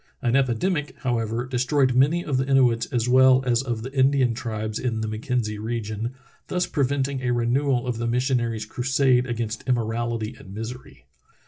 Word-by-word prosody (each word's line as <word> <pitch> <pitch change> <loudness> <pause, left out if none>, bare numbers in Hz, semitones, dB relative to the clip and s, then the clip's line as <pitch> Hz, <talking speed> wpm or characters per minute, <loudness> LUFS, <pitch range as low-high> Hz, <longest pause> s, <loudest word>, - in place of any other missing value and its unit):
An 120 -1 +2
epidemic, 140 +5 0
however, 120 -1 -1
destroyed 130 +1 +1
many 145 +7 +3
of 140 -4 0
the 130 +1 0
Inuits 125 -4 +3
as 120 -4 -1
well 130 +1 +5
as 120 -1 +2
of 120 -4 -4
the 130 +2 -7
Indian 135 -2 +3
tribes 110 -2 -4
in 115 -3 -2
the 110 - -2
Mackenzie 110 -1 -2
region, 110 +1 -4 0.3
thus 180 -1 0
preventing 140 -2 -1
a 125 - -1
renewal 120 +2 +1
of 120 -2 -3
the 120 - -1
missionary's 120 -3 0
crusade 130 +2 +1
against 115 -2 -3
immoral 120 -1 0
ity 110 -1 -4
and 95 0 -11
misery. 110 - -8
125 Hz, 165 wpm, -24 LUFS, 115-130 Hz, 0.3 s, well